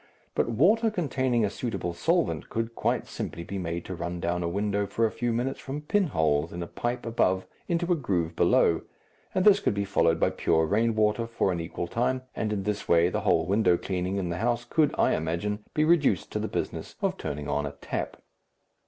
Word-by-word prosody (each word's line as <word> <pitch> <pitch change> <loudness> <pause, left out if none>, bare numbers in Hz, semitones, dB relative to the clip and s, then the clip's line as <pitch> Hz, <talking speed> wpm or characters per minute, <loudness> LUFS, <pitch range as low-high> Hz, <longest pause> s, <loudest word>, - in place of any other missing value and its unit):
But - - +1
water 205 - +4
containing 130 - 0
a - - 0
suitable 110 -9 -3
solvent 170 - 0
could 115 0 -2
quite - - 0
simply 85 - -5
be 100 +3 -5
made 85 -1 -3
to 95 - -5
run 85 0 -4
down 85 +1 -1
a 85 - -1
window 100 +2 0
for 115 +3 +1
a 110 - 0
few 120 -1 -1
minutes 125 +4 -1
from 140 +2 -5
pinholes 80 - +1
in 85 0 -4
a - - -6
pipe 120 +5 -3
above 95 -5 +1 0.2
into 175 +1 0
a - - +5
groove 90 - -1
below, - - +3 0.5
and 185 - +2
this 205 -1 +7
could 110 - 0
be 100 0 -1
followed 85 -4 +2
by - - +3
pure 80 0 +2
rain 110 +5 +1
water 110 +2 +2
for 115 -4 0
an 85 - -2
equal 85 +1 -4
time, 125 +7 -1
and 110 - -1
in 100 -2 -1
this 105 +1 -2
way 85 +1 +5
the - - -2
whole - - +2
window 100 -2 +3
cleaning 90 +1 -2
in 90 -3 -2
the 85 - -2
house 120 +1 0
could, 150 +4 +2
I - - +3
imagine, 85 +6 -1 0.2
be 155 - +3
reduced 150 - +3
to - - -2
the - - -2
business - - -4
of - - +1
turning 75 0 -5
on 75 0 0
a 70 - -7
tap. 70 - -4
105 Hz, 215 wpm, -27 LUFS, 85-125 Hz, 0.5 s, this